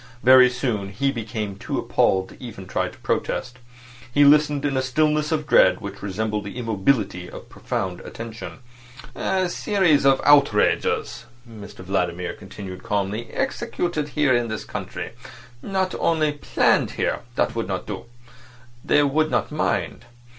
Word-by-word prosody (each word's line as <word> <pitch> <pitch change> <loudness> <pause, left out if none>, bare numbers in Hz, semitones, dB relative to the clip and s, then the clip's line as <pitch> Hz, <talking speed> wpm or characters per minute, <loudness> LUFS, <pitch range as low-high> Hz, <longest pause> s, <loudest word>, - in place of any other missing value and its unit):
Very 130 0 +8
soon 120 -6 -2
he 135 +8 0
became 110 -4 -4
too - - -4
appalled 95 0 +1
to - - -14
even 100 -6 -8
try 95 - -1
to - - -11
protest. 125 0 -2 0.5
He 145 +3 +5
listened 145 0 +4
in 140 -2 0
a 130 - +2
stillness 150 +3 +1
of 155 -1 0
dread 90 -10 +5
which 100 0 -8
resembled 105 +1 -2
the 100 - -7
immobility 105 -5 0
of - - -11
profound 95 -2 -4
attention. 115 +3 -8 0.5
"A 185 -1 0
series 175 -5 +2
of 135 -1 +5
outrages," 140 -8 +3 0.2
Mr 105 -4 -11
Vladimir 90 -2 -1
continued 95 -1 -9
calmly, 105 +3 -2
"executed 155 -4 -2
here 145 -3 +4
in 120 -1 +1
this 110 -1 -5
country; - - -6 0.5
not 190 -2 -1
only 155 -2 +1
planned 145 -1 +1
here—that - - -1
would - - -2
not - - -3
do—they 120 +2 -4
would 155 +2 +1
not - - 0
mind. 150 0 -2
120 Hz, 140 wpm, -23 LUFS, 105-145 Hz, 0.5 s, Very